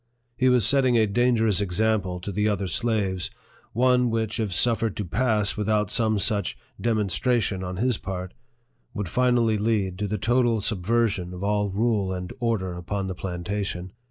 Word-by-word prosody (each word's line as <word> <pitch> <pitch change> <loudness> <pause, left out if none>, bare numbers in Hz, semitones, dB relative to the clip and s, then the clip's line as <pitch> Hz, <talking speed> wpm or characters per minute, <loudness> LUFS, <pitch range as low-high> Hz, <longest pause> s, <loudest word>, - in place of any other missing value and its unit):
He 130 +2 +3
was 125 -5 +4
setting 130 -3 +4
a 110 - +4
dangerous 110 -2 +2
example 100 -1 0
to 100 - -5
the 105 +2 +1
other 100 -2 -1
slaves, 100 -2 -1 0.4
one 125 +1 +3
which, 110 0 -1
if 110 -3 -1
suffered 115 +2 +2
to 105 - -2
pass 105 +2 +1
without 105 -1 0
some 110 -2 +2
such 100 -1 0 0.2
demon 110 -3 +1
stration 110 -1 0
on 90 0 -5
his 120 +2 +1
part, 95 -1 -5 0.6
would 105 -3 -3
finally 120 -1 +2
lead 100 -4 0
to 105 - -1
the 105 +2 -2
total 120 +2 +2
sub 105 -3 -1
version 100 -4 0
of 90 - -7
all 105 0 +1
rule 105 -1 0
and 90 0 -5
order 110 -7 -1
upon 95 +3 -3
the 95 - -3
plantation. 90 0 -4
105 Hz, 170 wpm, -25 LUFS, 95-115 Hz, 0.6 s, was